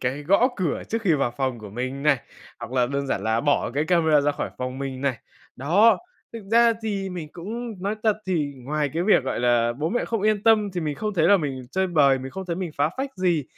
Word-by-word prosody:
cái 130 +3 -2
gõ 200 - +4
cửa 180 -6 -1
trước 225 +1 -2
khi 180 -6 +3
vào 140 -4 0
phòng 130 -2 -1
của 105 -2 -10
mình 130 +5 -4
này, 140 -3 +3 0.4
hoặc 120 - -8
là 125 -2 +2
đơn 140 +2 -2
giản 100 - -2
là 110 +1 +1
bỏ 145 -4 +1
cái 150 +2 +1
camera 160 -4 +3
ra 145 0 +1
khỏi - - -4
phòng 130 +1 -4
mình 135 -1 -5
này. 130 -5 -1 0.4
Đó. 185 - +4 0.3
Thực 230 -2 -7
ra 235 0 +6
thì 200 -3 -2
mình 170 -4 -6
cũng 215 +2 -6
nói 200 +2 -1
thật 215 -2 +2
thì 155 -6 -1
ngoài 145 +3 -2
cái 165 - 0
việc, 185 -8 +4
gọi 130 - -2
là, 120 -1 +2
bố 150 +6 -2
mẹ 245 +7 -1
không 225 -3 -2
yên 215 -1 +2
tâm 215 -3 +4
thì 180 - -2
mình 150 -3 -2
không 210 +7 -3
thấy 165 -2 +3
là 200 - +7
mình 140 -7 -3
chơi 190 0 0
bời, 140 -6 +4
mình 130 +1 -7
không 190 +5 -7
thấy 170 -1 -2
mình 180 -3 -4
phá 145 +1 +2
phách 270 +1 -3
gì, 175 -5 +1
155 Hz, 250 wpm, -24 LUFS, 135-195 Hz, 0.4 s, là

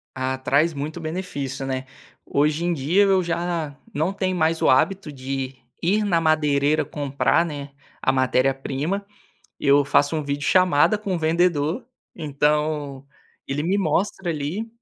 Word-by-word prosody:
Ah, 130 0 -2
traz 145 +5 +2
muito 150 +4 -5
benefício, 155 -5 -4
né, 130 0 -3 0.4
hoje 150 +3 +1
em 175 - +1
dia 165 +8 +2
eu 190 -2 +3
já 170 -3 -2 0.2
não 160 +4 0
tenho 185 -2 -1
mais 160 -1 +1
o - - +3
hábito 165 +5 +2
de 135 0 -4 0.3
ir 205 +5 +2
na 180 -5 +2
madeireira 155 -1 +2
comprar, 145 +3 0
né, 145 -3 -6 0.3
a 130 - +2
matéria 130 0 +2
prima, 145 +9 -3 0.5
eu 140 0 +4
faço 145 +2 +2
um 155 - -1
vídeo 140 0 -3
chamada 185 +2 +4
com 200 -4 -3
vendedor, 165 - +1 0.3
então 150 -2 -1 0.4
ele 145 +2 -2
me 185 +4 +1
mostra 195 -1 0
ali. 160 +9 -3
155 Hz, 145 wpm, -23 LUFS, 140-175 Hz, 0.5 s, eu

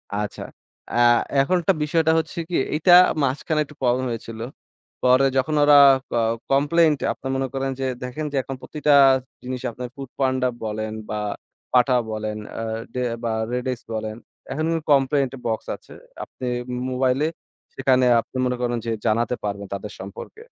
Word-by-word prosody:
আচ্ছা। 105 0 -4 0.5
এ্যাঁ 120 0 +5 0.2
এখন 160 +7 +1
একটা 180 +3 +3
বিষয়টা 160 +1 +2
হচ্ছে 160 +1 -6
কি 175 - -2 0.2
এইটা 170 +4 +4 0.3
মাঝখানে 140 +3 0
একটু 150 - -16
প্রবলেম 125 +1 +1
হয়েছিল। 115 -1 -6 0.6
পরে 130 +2 +5
যখন 155 +4 +1
ওরা 145 0 +7 0.3
ক - - -8 0.4
কমপ্লেইন্ট 150 +3 +4
টা - - -1
আপনারা 135 - -6
মনে 135 0 -1
করেন 135 0 -1
যে 135 - -1 0.2
দেখেন 125 +5 -4
যে 140 - -2
এখন 135 - -6
প্রতিটা 150 -1 0 0.5
জিনিস 125 0 -5
আপনার 125 +2 -6
foodpanda 130 -1 -1 0.2
বলেন 110 0 -3 0.2
বা 105 - -2 0.5
Pathao 125 0 +4 0.2
বলেন 110 0 -3
এ্যাঁ 110 0 -4 0.2
দে 125 - -2 0.2
বা 115 - 0 0.2
REDX 125 0 -2
বলেন। 110 0 -4 0.4
এখন 155 +4 -1 0.3
কমপ্লেইন 135 -1 +3
বক্স 110 -1 -2
আছে। - - -16 0.3
আপনি 125 - -7 0.4
মোবাইলে, 130 +3 +1 0.5
সেখানে 130 -1 +2 0.2
আপনি 130 - -10
মনে 125 0 -1
করেন 120 -1 0
যে 115 - -1
জানাতে 115 +2 +1
পারবেন 100 -1 -4
তাদের 100 +1 -5
সম্পর্কে। 100 - -9
130 Hz, 155 wpm, -23 LUFS, 115-140 Hz, 0.6 s, ওরা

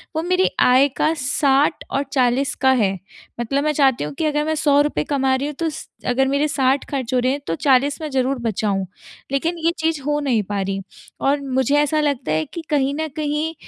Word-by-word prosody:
वो 320 - 0
मेरी 365 +1 +2
आय 255 +3 +5
का 315 - +2
60 280 +2 +1
और 275 - 0
40 260 +1 +2
का 265 0 +5
है। 195 -1 +2 0.5
मतलब 275 +5 -1
मैं 305 - +2
चाहती 270 - +2
हूँ 150 -1 -5
कि 310 - -2
अगर 295 0 +1
मैं 315 0 0
₹100 290 0 +2
कमा 270 -2 0
रही 275 +2 -2
हूँ 300 - -6
तो 330 -1 0
स 300 - -8 0.2
अगर 265 +2 +2
मेरे 280 +2 +1
60 270 -1 +1
ख़र्च 260 -3 -3
हो 250 - +3
रहे 255 +1 +1
हैं 285 - -2
तो - - -1
40 275 - +2
में 305 - -4
ज़रूर 265 0 0
बचाऊँ, 205 -4 -1 0.5
लेकिन 330 +5 -1
ये 330 +1 +1
चीज़ 320 -2 0
हो 295 +2 -1
नहीं 250 -7 +1
पा 200 +1 -3
रही। 195 0 -3 0.4
और 280 +1 +2
मुझे 265 +1 0
ऐसा 295 +1 +2
लगता 280 - -1
है 155 0 +1
कि 335 - -8
कहीं 280 -2 +1
न 315 0 -2
कहीं 305 +1 -2
275 Hz, 220 wpm, -21 LUFS, 255-295 Hz, 0.5 s, आय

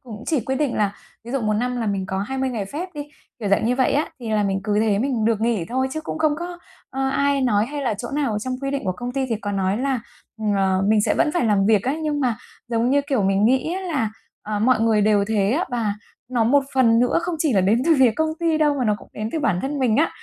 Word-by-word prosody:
cũng 230 -2 -9
chỉ 305 -6 +1
quy 265 +4 -2
định 280 -2 -1
là 205 -2 +1 0.3
ví 235 - -8
dụ 275 - 0
một 215 -1 0
năm 250 +3 -1
là 230 -2 -2
mình 195 -2 -1
có 190 0 -3
20 265 +6 -2
ngày 225 -5 -3
phép 305 - -5
đi, 290 0 -6 0.3
kiểu 210 -4 -3
dạng 200 - +2
như 245 +2 +2
vậy 260 - +2
á, 295 +3 +1
thì 230 -2 -5
là 210 -1 +2
mình 195 -1 0
cứ 210 0 +1
thế 210 -2 +2
mình 245 -3 0
được 225 -1 +1
nghỉ 225 -6 0
thôi. 260 +2 0
Chứ 315 - -3
cũng 315 - -5
không 305 -2 +2
có, 350 0 -6 0.3
ơ, 270 0 -1
ai 280 0 +1
nói 215 -4 +2
hay 290 +1 -5
là 245 -5 0
chỗ 240 +5 -6
nào 275 -7 -1
trong 255 +4 -3
quy 275 - -1
định 275 -4 -3
của 185 - 0
công 245 +5 -6
ty 270 -1 -1
thì 230 -4 -1
có 205 -1 -4
nói 195 0 0
là, 265 -2 0 0.6
ờ, 190 -1 +2
mình 215 -1 +4
sẽ - - +1
vẫn 300 - +2
phải 345 - +1
làm 205 -3 +2
việc 215 -3 +4
á, 265 +3 0
nhưng 295 -1 -1
mà, 245 -5 +1 0.3
giống 235 +1 +1
như 285 - +4
kiểu, 265 -8 +1
mình 195 +1 +2
nghĩ 260 +8 +2
á 380 - -3
là, 290 - -1 0.3
ờ, 210 0 -3
mọi 240 +1 +3
người 225 -2 +3
đều 205 -1 +3
thế 205 -2 +1
á 335 +6 +1
và 225 -4 -1 0.4
nó 235 -3 +2
một 275 +4 +3
phần 230 -3 +4
nữa 250 +5 +2
không 345 -1 -2
chỉ 305 -4 +1
là 195 - +4
đến 215 +6 +2
từ 330 - +5
phía 255 -3 +6
công 315 +7 0
ty 325 -2 +1
đâu 295 -2 +3
mà 250 - 0
nó 210 - +2
cũng - - -15
đến 215 +1 -4
từ - - -1
bản 190 -10 +1
thân 280 +1 -2
mình 240 -4 +2
á. 315 - +3
240 Hz, 290 wpm, -22 LUFS, 210-275 Hz, 0.6 s, phía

